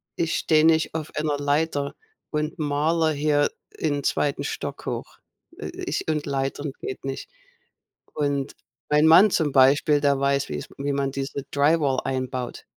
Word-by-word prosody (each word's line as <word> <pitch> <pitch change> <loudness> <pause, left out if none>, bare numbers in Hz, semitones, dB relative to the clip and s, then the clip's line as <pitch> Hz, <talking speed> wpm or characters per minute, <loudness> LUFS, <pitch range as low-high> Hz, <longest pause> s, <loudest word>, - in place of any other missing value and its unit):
ich 165 -1 0
stehe 155 -1 +3
nicht 160 0 +3
auf 155 -1 -4
einer 150 -1 0
Leiter 145 0 0 0.4
und 150 +2 -2
malere 155 +2 +1
hier 145 0 +2 0.3
in 145 -3 -1
2. 145 -1 0
Stock - - -5
hoch. - - -5 0.4
Äh, - - -6
äh, - - -8
ich - - -3
und 155 -2 -1
Leitern 140 +1 -2
geht 130 - -6
nicht. 135 0 -5 0.9
Und 145 -2 -1 0.3
mein 150 +1 +4
Mann 180 +6 +8
zum 155 -6 +1
Beispiel, 140 +3 +5
der 140 -1 +2
weiß, 140 0 +1
wie's 75 -1 -5
wie 140 +1 -1
man 140 -1 0
diese 135 +1 -4
Dry 145 +4 +3
Wall 135 -3 +1
einbaut. 130 -1 -3
145 Hz, 160 wpm, -24 LUFS, 140-155 Hz, 0.9 s, Mann